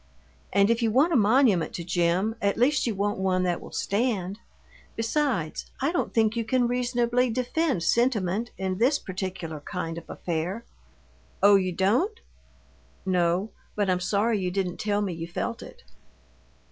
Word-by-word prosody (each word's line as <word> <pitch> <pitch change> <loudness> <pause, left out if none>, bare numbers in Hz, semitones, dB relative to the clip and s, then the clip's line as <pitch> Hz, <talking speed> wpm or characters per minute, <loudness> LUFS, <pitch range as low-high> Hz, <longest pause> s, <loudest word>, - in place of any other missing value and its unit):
And 200 +3 +4
if 230 +1 +1
you 230 - +2
want 280 +10 +3
a - - +3
monument 215 -5 +3
to 170 - -4
Jim, 175 +4 +1
at 200 0 +1
least 260 +3 +2
you 225 - -1
want 205 +1 -1
one 185 -1 +1
that 175 -2 -1
will - - -11
stand. 200 -3 -1 0.6
Besides, 230 - -1
I 275 +4 +1
don't 350 - -1
think 220 -1 +2
you 230 - 0
can 245 +2 +1
reasonably 245 0 +1
defend 255 - 0
sentiment 230 -2 +1
in 190 0 -2
this 265 +5 +4
particular 185 - -5
kind 165 +1 -5
of - - -19
affair." 175 +7 -3 0.8
"Oh, 205 0 +8
you 185 -2 +2
don't?" 240 - +1 0.9
"No, 180 +2 +1 0.2
but 205 -3 +1
I'm 180 - +1
sorry 205 +4 +1
you 180 -1 -1
didn't 180 -1 -2
tell 205 -1 0
me 190 -3 -2
you 165 0 -6
felt 170 - -4
it." - - -12
205 Hz, 160 wpm, -26 LUFS, 185-240 Hz, 0.9 s, Oh